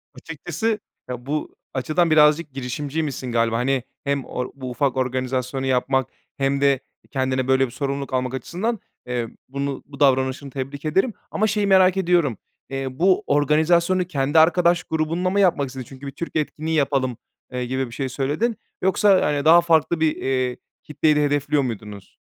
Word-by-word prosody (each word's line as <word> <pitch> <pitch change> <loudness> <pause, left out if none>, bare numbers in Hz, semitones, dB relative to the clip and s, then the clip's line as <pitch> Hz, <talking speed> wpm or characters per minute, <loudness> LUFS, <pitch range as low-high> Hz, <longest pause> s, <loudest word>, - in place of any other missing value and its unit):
Açıkçası, 175 +8 -3 0.3
ya, 125 -1 -6
bu 150 +2 -3 0.2
açıdan 155 +5 +1
birazcık 150 0 +4
girişimciymişsin 135 0 -3
galiba. 115 -1 +1
Hani, 130 +1 0 0.2
hem 140 -1 -1
or 125 0 -4
bu 130 -2 -6
ufak 130 +2 0
organizasyonu 130 +1 -1
yapmak 130 0 +1 0.3
hem 140 0 0
de 140 -2 +4 0.3
kendine 130 -2 0
böyle 130 0 +4
bir 120 - -9
sorumluluk 140 0 -3
almak 130 0 -1
açısından, 185 - -3 0.3
eee, 120 -2 -2 0.2
bunu 140 0 -3
bu 140 0 -13
davranışını 130 0 +2
tebrik 140 +3 -6
ederim. 190 +10 +1 0.2
Ama 215 - +1
şeyi 210 -1 0
merak 190 -1 +5
ediyorum, 170 - +2 0.3
eee, 135 0 -3
bu 185 +1 +3
organizasyonu 170 +5 +3
kendi 145 -2 +2
arkadaş 175 +1 +4
grubunla 160 +3 -1
mı 200 - +1
yapmak 175 -8 +3
istedin? 130 -1 -7
Çünkü 135 +1 -10
"Bir - - -5
Türk 165 +5 -7
etkinliği 155 +1 -1
yapalım." 135 -4 +1 0.3
eee, 125 0 -3
gibi 130 +1 -2
bir - - -13
şey 135 -2 -2
söyledin. 150 - -1 0.2
Yoksa, 190 +1 +4
hani, 145 0 0
daha 170 +2 +8
farklı 165 -1 +2
bir, 160 -1 +2
eee, 130 -2 -1 0.3
kitleyi 150 0 +1
de 150 - +3
hedefliyor 145 0 +1
muydunuz? 105 -5 -7
140 Hz, 165 wpm, -22 LUFS, 130-160 Hz, 0.3 s, daha